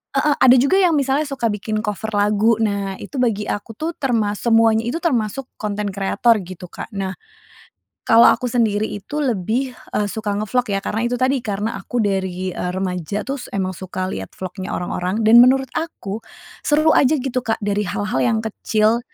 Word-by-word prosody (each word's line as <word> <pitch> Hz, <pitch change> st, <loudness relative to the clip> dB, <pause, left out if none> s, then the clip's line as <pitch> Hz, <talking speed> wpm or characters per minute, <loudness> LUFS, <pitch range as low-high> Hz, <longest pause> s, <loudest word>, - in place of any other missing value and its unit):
heeh, 285 Hz, +1 st, +3 dB
ada 255 Hz, 0 st, +7 dB
juga 280 Hz, +10 st, +4 dB
yang 355 Hz, -4 st, +4 dB
misalnya 280 Hz, +1 st, +1 dB
suka 260 Hz, -5 st, -1 dB
bikin 215 Hz, +1 st, -3 dB
cover 210 Hz, 0 st, -3 dB
lagu, 210 Hz, +2 st, +3 dB
nah 200 Hz, -2 st, -1 dB
itu 270 Hz, +7 st, -7 dB
bagi 225 Hz, -4 st, +1 dB
aku 205 Hz, +2 st, -5 dB
tuh 315 Hz, +8 st, -3 dB
termas 220 Hz, -6 st, 0 dB
semuanya 225 Hz, -1 st, +3 dB
itu, 330 Hz, +9 st, -3 dB
termasuk 255 Hz, -, -1 dB
konten 205 Hz, -1 st, -2 dB
kreator 205 Hz, +4 st, +2 dB
gitu 180 Hz, 0 st, -9 dB
Kak. -, -, -7 dB
Nah, 190 Hz, -1 st, -3 dB, 0.9 s
kalau 230 Hz, +1 st, +7 dB
aku -, -, +2 dB
sendiri 215 Hz, -3 st, +2 dB
itu 290 Hz, +9 st, -5 dB
lebih, 240 Hz, +3 st, -1 dB, 0.2 s
eee, 210 Hz, -, +1 dB
suka 210 Hz, -2 st, -2 dB
nge-vlog 225 Hz, +3 st, -1 dB
ya, 195 Hz, -, -1 dB
karena 225 Hz, +3 st, -1 dB
itu 245 Hz, -, -1 dB
tadi, 260 Hz, +2 st, +1 dB
karena 210 Hz, 0 st, -3 dB
aku 245 Hz, +4 st, -2 dB
dari, 185 Hz, -2 st, -2 dB
eee, 180 Hz, -, -3 dB
remaja 185 Hz, +1 st, -3 dB
tuh 275 Hz, 0 st, -3 dB
s -, -, -9 dB
emang 190 Hz, -1 st, -1 dB
suka 185 Hz, 0 st, -5 dB
lihat 95 Hz, -, -6 dB
vlognya 185 Hz, 0 st, -6 dB
orang-orang, 180 Hz, +4 st, -2 dB
dan 230 Hz, +2 st, +8 dB
menurut 260 Hz, +1 st, +4 dB
aku, 225 Hz, -, -4 dB, 0.4 s
seru 310 Hz, +1 st, +3 dB
aja 285 Hz, +3 st, +4 dB
gitu 255 Hz, -2 st, -2 dB
Kak 225 Hz, -2 st, -2 dB
dari 205 Hz, 0 st, 0 dB
hal-hal 205 Hz, +3 st, -1 dB
yang 230 Hz, -2 st, +2 dB
kecil, 220 Hz, +1 st, +1 dB
220 Hz, 180 wpm, -20 LUFS, 200-250 Hz, 0.9 s, dan